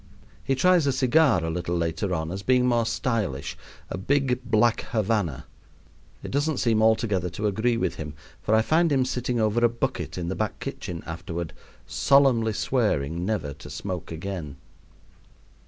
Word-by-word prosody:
He 135 Hz, -, +1 dB
tries 175 Hz, +2 st, +4 dB
a -, -, +4 dB
cigar 130 Hz, -, +3 dB
a -, -, -1 dB
little 85 Hz, +1 st, -2 dB
later 85 Hz, +3 st, -1 dB
on 80 Hz, -2 st, -2 dB
as 95 Hz, +1 st, -4 dB
being 125 Hz, +3 st, +3 dB
more 120 Hz, -2 st, +2 dB
stylish 105 Hz, -, -2 dB, 0.3 s
a -, -, -5 dB
big 130 Hz, +3 st, +1 dB
black 115 Hz, 0 st, +2 dB
Havanna. 105 Hz, -, 0 dB, 0.8 s
It -, -, -6 dB
doesn't 145 Hz, +1 st, 0 dB
seem 115 Hz, -3 st, +2 dB
altogether 110 Hz, -5 st, +2 dB
to 95 Hz, +6 st, -4 dB
agree 110 Hz, +4 st, +1 dB
with -, -, -1 dB
him, 75 Hz, -1 st, -6 dB, 0.3 s
for 110 Hz, -, +2 dB
I 110 Hz, -, +4 dB
find 165 Hz, +5 st, +3 dB
him 130 Hz, -2 st, +3 dB
sitting 125 Hz, -1 st, -1 dB
over 110 Hz, +2 st, +2 dB
a 120 Hz, -, +6 dB
bucket 125 Hz, 0 st, -3 dB
in 85 Hz, -2 st, -3 dB
the 95 Hz, -, -2 dB
back 110 Hz, -1 st, -2 dB
kitchen 85 Hz, -2 st, -6 dB
afterward, 85 Hz, 0 st, -5 dB, 0.3 s
solemnly 130 Hz, -6 st, +3 dB
swearing 90 Hz, -, 0 dB
never 85 Hz, -10 st, -2 dB
to -, -, -12 dB
smoke 90 Hz, -4 st, -5 dB
again. 80 Hz, -3 st, -5 dB
110 Hz, 165 wpm, -25 LUFS, 90-125 Hz, 0.8 s, a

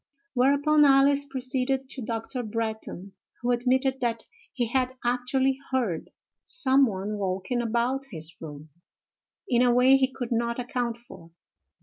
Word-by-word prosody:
Whereupon 285 Hz, +4 st, +4 dB
Alice 280 Hz, 0 st, +5 dB
proceeded 260 Hz, 0 st, -2 dB
to 265 Hz, -, -5 dB
Dr. 230 Hz, +3 st, -3 dB
Bretton, 220 Hz, -4 st, -4 dB, 0.3 s
who 245 Hz, -, +1 dB
admitted 260 Hz, +2 st, +1 dB
that 230 Hz, -2 st, -1 dB, 0.3 s
he 245 Hz, -, -1 dB
had 255 Hz, +2 st, -1 dB
actually 260 Hz, +2 st, +1 dB
heard 235 Hz, -11 st, -1 dB, 0.3 s
some 270 Hz, 0 st, +3 dB
one 205 Hz, 0 st, -4 dB
walking 195 Hz, +5 st, -1 dB
about 240 Hz, +4 st, 0 dB
his 160 Hz, -1 st, -2 dB
room, 150 Hz, -1 st, -9 dB, 0.8 s
in 245 Hz, -1 st, +3 dB
a 250 Hz, -1 st, +4 dB
way 255 Hz, +2 st, +6 dB
he 265 Hz, -1 st, +1 dB
could 250 Hz, -2 st, -6 dB
not 235 Hz, 0 st, 0 dB
account 245 Hz, -1 st, -2 dB
for. 190 Hz, -8 st, -14 dB
245 Hz, 135 wpm, -26 LUFS, 225-265 Hz, 0.8 s, way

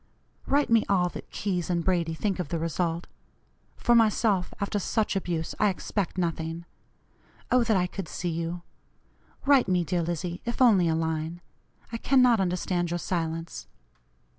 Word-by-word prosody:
Write 285 Hz, -3 st, +2 dB
me 230 Hz, -1 st, +5 dB
all 180 Hz, -3 st, +3 dB
that -, -, -9 dB
Keyes 180 Hz, -4 st, -2 dB
and 170 Hz, -1 st, 0 dB
Brady 170 Hz, -3 st, +1 dB
think 195 Hz, +2 st, -1 dB
of 180 Hz, -, -2 dB
the 170 Hz, -, -1 dB
result. 165 Hz, +1 st, -1 dB, 0.7 s
For 240 Hz, -, +2 dB
myself, 215 Hz, -4 st, +3 dB
after 205 Hz, 0 st, -1 dB
such 215 Hz, +2 st, 0 dB
abuse, 170 Hz, -4 st, -2 dB
I 210 Hz, -, +4 dB
expect 190 Hz, 0 st, -3 dB
nothing. 165 Hz, -1 st, -2 dB, 0.9 s
Oh! 250 Hz, -1 st, +5 dB
that 220 Hz, -3 st, +2 dB
I 180 Hz, -, +2 dB
could 180 Hz, 0 st, -6 dB
see 175 Hz, -, -3 dB
you. 170 Hz, +1 st, -3 dB, 0.8 s
Write 275 Hz, -5 st, +5 dB
me, 180 Hz, -2 st, +2 dB
dear 175 Hz, +2 st, -1 dB
Lizzie, 175 Hz, +1 st, -3 dB
if 235 Hz, -1 st, -4 dB
only 210 Hz, -9 st, +5 dB
a 160 Hz, -, +2 dB
line; 160 Hz, +1 st, -2 dB, 0.5 s
I 230 Hz, -, -2 dB
cannot 250 Hz, -2 st, +4 dB
understand 180 Hz, -1 st, 0 dB
your 175 Hz, -, -1 dB
silence. 165 Hz, -, -3 dB
180 Hz, 160 wpm, -27 LUFS, 170-210 Hz, 0.9 s, me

